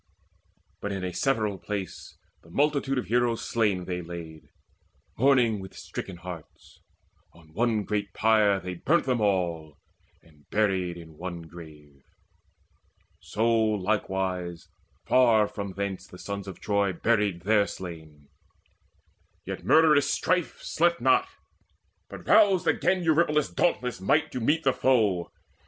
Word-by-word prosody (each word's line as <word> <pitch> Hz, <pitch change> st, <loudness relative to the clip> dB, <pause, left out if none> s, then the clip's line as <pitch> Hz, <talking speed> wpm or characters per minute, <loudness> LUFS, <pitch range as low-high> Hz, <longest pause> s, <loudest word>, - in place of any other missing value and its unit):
But 100 Hz, -, -3 dB
in 95 Hz, -1 st, -4 dB
a 90 Hz, -1 st, -3 dB
several 110 Hz, -5 st, 0 dB
place 100 Hz, -4 st, -6 dB, 0.2 s
The 80 Hz, -, -19 dB
multitude 140 Hz, -, +1 dB
of 125 Hz, -, -1 dB
heroes 120 Hz, 0 st, 0 dB
slain 105 Hz, -6 st, 0 dB
they 90 Hz, -1 st, -3 dB
laid, 85 Hz, -2 st, -9 dB, 0.7 s
Mourning 125 Hz, -4 st, +3 dB
with 95 Hz, -1 st, -10 dB
stricken 95 Hz, -3 st, -7 dB
hearts. 85 Hz, -3 st, -11 dB, 0.5 s
On 80 Hz, -2 st, -20 dB
one 110 Hz, +1 st, +1 dB
great 100 Hz, 0 st, -2 dB
pyre 110 Hz, -3 st, +3 dB
They 90 Hz, -1 st, -6 dB
burnt 155 Hz, -, +1 dB
them 125 Hz, -3 st, 0 dB
all, 85 Hz, -7 st, -1 dB, 0.5 s
and 75 Hz, -3 st, -24 dB
buried 95 Hz, -5 st, 0 dB
in 80 Hz, -2 st, -13 dB
one 85 Hz, -1 st, -6 dB
grave. 75 Hz, -4 st, -14 dB, 1.2 s
So 110 Hz, +2 st, -1 dB
likewise 95 Hz, -5 st, -1 dB, 0.4 s
far 115 Hz, -4 st, +4 dB
from 100 Hz, -2 st, -6 dB
thence 95 Hz, -2 st, -4 dB
the 90 Hz, -, -13 dB
sons 100 Hz, +1 st, -6 dB
of 95 Hz, -, -8 dB
Troy 100 Hz, -2 st, 0 dB
Buried 100 Hz, -2 st, 0 dB
their 105 Hz, 0 st, +3 dB
slain. 80 Hz, -5 st, -9 dB, 1.2 s
Yet -, -, -6 dB
murderous 155 Hz, -3 st, +5 dB
Strife 180 Hz, -2 st, -1 dB
slept 170 Hz, +1 st, +1 dB
not, 130 Hz, +2 st, +3 dB, 0.8 s
But -, -, -10 dB
roused 200 Hz, -4 st, +5 dB
again 185 Hz, 0 st, +2 dB
Eurypylus' 155 Hz, -2 st, +2 dB
dauntless 125 Hz, -, 0 dB
might 95 Hz, -, +2 dB
To 125 Hz, -, -4 dB
meet 150 Hz, +8 st, +1 dB
the 135 Hz, -, +3 dB
foe. 105 Hz, -9 st, +1 dB
100 Hz, 130 wpm, -27 LUFS, 90-120 Hz, 1.2 s, murderous